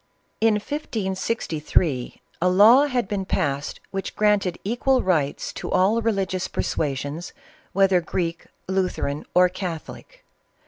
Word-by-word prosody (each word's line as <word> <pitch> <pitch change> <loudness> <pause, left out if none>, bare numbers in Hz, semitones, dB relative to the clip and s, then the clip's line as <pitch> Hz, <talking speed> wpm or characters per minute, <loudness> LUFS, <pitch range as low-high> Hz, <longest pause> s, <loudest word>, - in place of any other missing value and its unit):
In 225 -1 +4
1563 190 - -2 0.2
a 180 - +4
law 225 +10 +7
had 250 -6 -1
been 200 -1 -2
passed 140 -6 -2
which 195 0 -4
granted 205 -4 +2
equal 245 +5 +1
rights 155 -7 0
to - - -6
all 205 +5 +3
religious 195 -4 -1
persuasions, 145 +3 -3 0.4
whether 195 -2 +3
Greek, 170 0 -3 0.2
Lu 190 0 +1
theran, 140 -2 -4
or 180 0 +7
Catholic. 185 - -7
190 Hz, 120 wpm, -23 LUFS, 170-215 Hz, 0.4 s, law